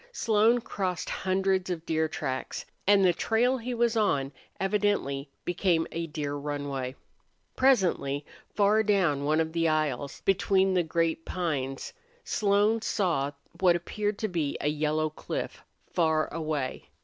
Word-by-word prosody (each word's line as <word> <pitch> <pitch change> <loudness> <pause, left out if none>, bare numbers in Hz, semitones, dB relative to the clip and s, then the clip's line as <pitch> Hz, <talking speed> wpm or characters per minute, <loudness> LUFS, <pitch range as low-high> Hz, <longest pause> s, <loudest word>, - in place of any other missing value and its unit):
Slone 225 - +3
crossed 185 -6 -3
hundreds 190 0 0
of 170 -2 -3
deer 160 0 +1
tracks, 130 -4 -4 0.2
and 200 -1 +6
the 180 - +5
trail 245 +7 +1
he 245 +1 -4
was 235 0 +2
on 145 -11 +1 0.3
evidently 195 -9 0 0.2
became 175 -2 +1
a 165 0 -3
deer 150 -2 -3
runway. 140 -3 -3 0.6
Presently, 180 - +2 0.3
far 210 +1 +4
down 185 -10 +2
one 155 +2 +2
of 160 0 -1
the 165 -1 +2
aisles 150 -3 -1
between 190 0 +2
the 180 - +3
great 165 0 0
pines 140 -8 -3 0.3
Slone 210 +2 +2
saw 165 -11 0 0.3
what 180 -2 +5
appeared 205 +4 -2
to 215 - -1
be 165 -7 -2
a 150 - 0
yellow 155 +1 0
cliff, - - -5 0.3
far 160 -3 +1
away. 155 -5 -3
170 Hz, 135 wpm, -28 LUFS, 150-200 Hz, 0.6 s, and